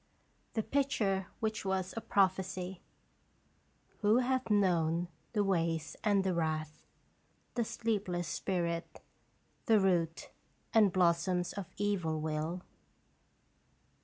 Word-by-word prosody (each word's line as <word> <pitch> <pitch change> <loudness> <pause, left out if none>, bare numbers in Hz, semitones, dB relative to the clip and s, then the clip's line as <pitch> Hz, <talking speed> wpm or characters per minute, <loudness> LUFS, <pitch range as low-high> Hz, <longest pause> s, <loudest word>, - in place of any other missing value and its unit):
The 220 - 0
Picture 210 -10 0
Which 220 -1 -1
Was 190 -1 -1
a 225 - -3
Prophecy. 185 -2 0 0.6
' - - -38
Who 215 +2 +5
hath 255 -1 +1
known 175 -4 +2 0.2
the 210 -2 +2
ways 165 -4 0
and 205 -3 +3
the 190 -1 +1
wrath, 155 -2 -2 0.7
The 240 - +1
sleepless 200 -7 -2
spirit, 170 -3 -2 0.7
the 220 -3 +6
root 175 -4 +1 0.4
And 215 -4 +6
blossom 175 0 +2
of 195 -3 -4
evil 185 -6 0
will?" 155 +3 -2
185 Hz, 105 wpm, -33 LUFS, 170-205 Hz, 0.7 s, the